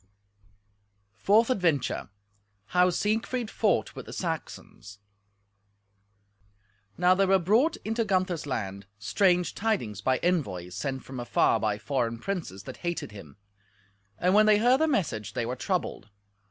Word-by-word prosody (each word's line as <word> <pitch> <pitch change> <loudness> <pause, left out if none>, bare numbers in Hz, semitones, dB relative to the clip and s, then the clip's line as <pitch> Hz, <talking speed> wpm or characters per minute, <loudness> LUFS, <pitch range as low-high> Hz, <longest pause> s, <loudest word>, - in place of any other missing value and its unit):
Fourth 215 - +3
Adventure 170 - 0 0.6
How 180 0 +4
Siegfried 220 +5 -1
Fought 210 -6 +1
with - - -8
the - - -8
Saxons 100 0 -6 2.0
Now 180 +1 +5
there 195 +1 +2
were 195 0 +5
brought 225 - +2
into 225 +2 0
Gunther's 185 -6 -1
land 100 -6 -4
strange 180 - +2
tidings 185 - -2
by 130 +3 +2
envoys 100 - -1
sent 130 +7 -4
from 130 -1 -8
afar 120 -1 +2
by 105 -2 0
foreign 120 -1 -1
princes 120 - -5
that - - -9
hated 175 -10 -4
him; 95 -8 -12 0.8
and 180 +1 +2
when 215 +1 +6
they 210 -1 +6
heard 245 +4 +4
the 320 - +4
message 160 - -1
they 120 -2 -2
were 125 +2 -3
troubled. 165 - -3
175 Hz, 135 wpm, -27 LUFS, -, 2.0 s, when